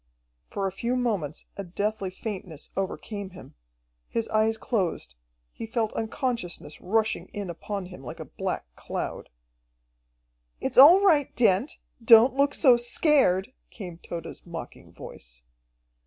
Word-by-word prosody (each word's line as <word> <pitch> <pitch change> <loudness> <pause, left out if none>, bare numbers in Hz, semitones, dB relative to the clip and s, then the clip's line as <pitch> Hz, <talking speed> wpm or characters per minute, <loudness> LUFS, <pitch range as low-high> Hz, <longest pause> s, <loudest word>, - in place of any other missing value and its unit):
For 200 - -3
a 190 - -1
few 235 +6 -2
moments 205 - -2
a 200 - -4
deathly 200 +2 -2
faintness 185 -5 -7
overcame 195 +1 -4
him... - - -13 0.6
his 230 -1 -2
eyes 220 +1 +2
closed, 185 - -2 0.4
he 225 - -7
felt 225 -2 -1
unconsciousness 220 - -3
rushing 220 +4 0
in 200 -4 -4
upon 195 +3 -5
him 180 -7 -11
like 120 - -8
a - - -6
black - - -4
cloud. - - -5 1.3
"It's - - +1
all 335 +8 +10
right, 315 -8 +3
Dent 225 +3 +3 0.3
don't 230 +3 +8
look 280 +1 +2
so 255 -5 +6
scared!" 240 - +2 0.2
came 180 -5 -9
Tode's 170 -2 -7
mocking 170 -2 -9
voice. - - -11
210 Hz, 130 wpm, -26 LUFS, 180-240 Hz, 1.3 s, all